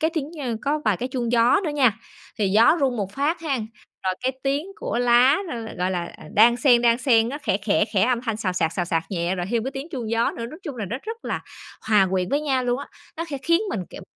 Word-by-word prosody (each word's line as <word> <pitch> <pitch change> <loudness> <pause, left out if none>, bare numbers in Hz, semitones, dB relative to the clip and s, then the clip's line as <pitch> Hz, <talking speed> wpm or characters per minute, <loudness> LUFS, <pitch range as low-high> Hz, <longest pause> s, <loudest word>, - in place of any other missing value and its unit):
cái 320 +1 +2
tiếng 300 -1 -2
nh 250 -7 -3
có 295 +2 0
vài 210 -4 +2
cái 250 - -4
chuông 245 -2 -2
gió 240 +11 +4
nữa 310 - -1
nha, 255 -7 +2 0.4
thì 200 -2 +2
gió 225 - +5
rung 260 -3 +1
một 200 -2 -3
phát 295 +7 -1
hén, 270 -9 -2 0.4
rồi 185 -1 +1
cái 260 +1 +1
tiếng 280 +5 0
của 240 - -3
lá 245 +3 +5
nó - - -4
l 225 -1 -6
gọi 180 +1 0
là, 175 -2 -3
ờ, - - -13
đan 235 +3 +6
xen, 245 -2 +4
đan 235 0 +4
xen, 230 -4 +3
nó 285 +3 -5
khẽ, 190 - +1
khẽ, 205 0 +2
khẽ, 190 -2 +2
âm 245 0 +2
thanh 225 -4 -2
xào 195 -4 -2
xạc, 165 -3 0
xào 175 - -1
xạc 165 -2 0
nhẹ 175 0 -1
rồi 175 -1 -3
thêm 230 -2 0
cái 265 - -2
tiếng 270 +4 -6
chuông 240 -8 -4
gió 230 0 +2
nữa. 230 - -6
Nói 310 +8 -10
chung 290 -8 -6
là 215 - -3
nó 210 +6 -4
rất 455 +2 -7
là - - -3 0.5
hòa 205 -3 +5
quyện 185 -1 0
với 285 +3 +1
nhau 265 -4 0
luôn 245 +1 0
á, 280 - -7 0.3
nó 330 - -3
khẽ 280 -3 -4
khiến 335 +2 +3
mình, 200 - -2
kiểu, - - -9
240 Hz, 275 wpm, -23 LUFS, 210-275 Hz, 0.5 s, đan